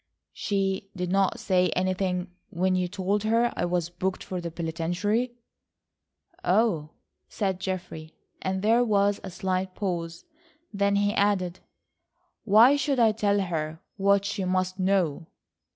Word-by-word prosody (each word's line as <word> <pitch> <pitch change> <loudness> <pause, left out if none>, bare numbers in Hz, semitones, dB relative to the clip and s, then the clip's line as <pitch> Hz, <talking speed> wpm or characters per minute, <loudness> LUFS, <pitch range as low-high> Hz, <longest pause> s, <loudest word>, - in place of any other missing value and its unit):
"She 195 -1 -1
did 180 -1 -3
not 195 0 +2
say 180 -2 +2
anything 185 0 -1 0.2
when 185 +2 +1
you 180 -1 +1
told 195 +2 -1
her 230 +3 +2
I - - 0
was 175 -1 -1
booked 185 +2 -3
for 185 -1 -4
the 170 - -4
penitentiary?" 175 +9 -1 1.1
"Oh," 190 - +2 0.4
said 190 -3 -2
Geoffrey, 180 -4 -5 0.3
and 190 +1 -2
there 230 +3 +4
was 205 -3 +2
a 190 - -5
slight 185 0 -2
pause. 170 -4 -4 0.5
Then 200 0 +2
he 205 0 +2
added: 190 -4 +1 0.9
"Why 225 +6 +7
should 285 -1 0
I 225 -2 +5
tell 205 -2 +1
her 160 -3 -3 0.2
what 200 0 +3
she 205 -1 -2
must 185 0 -1
know." 185 -4 +1
190 Hz, 135 wpm, -26 LUFS, 180-205 Hz, 1.1 s, Why